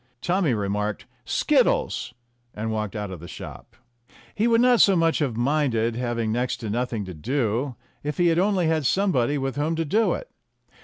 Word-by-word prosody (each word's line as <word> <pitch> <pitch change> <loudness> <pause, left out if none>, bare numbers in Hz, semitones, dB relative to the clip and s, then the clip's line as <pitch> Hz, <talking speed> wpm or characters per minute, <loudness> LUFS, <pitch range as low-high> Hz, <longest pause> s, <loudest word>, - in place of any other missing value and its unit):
Tommy 175 -6 +1
remarked 105 0 -2 0.2
"Skittles!" - - +1 0.4
and 110 +1 -3
walked 110 -1 -3
out 105 -2 -4
of 90 - -7
the 85 - -10
shop. - - -10 0.6
He 220 +3 +1
would 230 -1 +4
not 245 -1 +5
so 195 - +6
much 165 -1 +2
have 130 -7 -1
minded 120 -4 +1
having 120 -2 -1
next 125 +2 -1
to 110 -3 -3
nothing 120 -2 -2
to 95 - -7
do 120 - -1 0.3
if 150 0 -4
he 175 -1 +4
had 165 +1 +2
only 190 -2 +2
had 160 -4 +1
somebody 145 -9 +1
with 135 -1 -3
whom 155 +3 0
to 165 0 -1
do 215 +9 +2
it. - - -5
130 Hz, 185 wpm, -24 LUFS, 110-165 Hz, 0.6 s, so